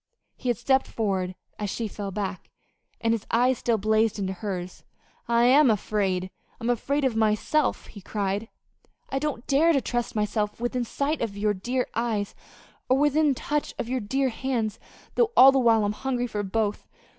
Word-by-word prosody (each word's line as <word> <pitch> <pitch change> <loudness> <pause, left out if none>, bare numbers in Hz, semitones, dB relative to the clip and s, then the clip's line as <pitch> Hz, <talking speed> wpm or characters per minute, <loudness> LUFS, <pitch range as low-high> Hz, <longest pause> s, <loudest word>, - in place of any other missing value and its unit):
He 255 - -4
had 240 - +1
stepped 265 +3 +2
forward 190 -4 -2 0.2
as 205 -1 -2
she 225 +3 -3
fell 200 -1 -5
back, 195 -2 -4 0.5
and 230 0 +2
his 225 -2 -3
eyes 245 +1 +2
still 235 -2 +1
blazed 220 +1 +2
into 190 -2 -2
hers. 185 -2 -5 0.4
"I 235 0 +3
am 265 +3 +6
afraid 190 -3 0 0.3
I'm 240 0 0
afraid 280 +4 0
of 250 -4 +1
myself," 225 +7 +1
he 205 - -12
cried. 205 +3 -2 0.6
"I 270 - 0
don't 285 -5 -3
dare 315 +5 +4
to 275 - +3
trust 240 -3 -3
myself 210 0 -1
within 240 +1 -1
sight 285 +6 -2
of 210 -4 -3
your 210 0 +1
dear 245 +6 -1
eyes, 220 -3 -1 0.6
or 260 - +4
within 295 0 +3
touch 295 +3 -2
of 235 - -4
your 260 0 0
dear 265 +5 0
hands 235 -3 -2 0.3
though 465 -2 +2
all 270 +1 +10
the 270 - +2
while 225 -4 +4
I'm 205 - 0
hungry 250 +1 -2
for 215 -3 -3
both. 205 +1 -2
230 Hz, 180 wpm, -26 LUFS, 210-260 Hz, 0.6 s, all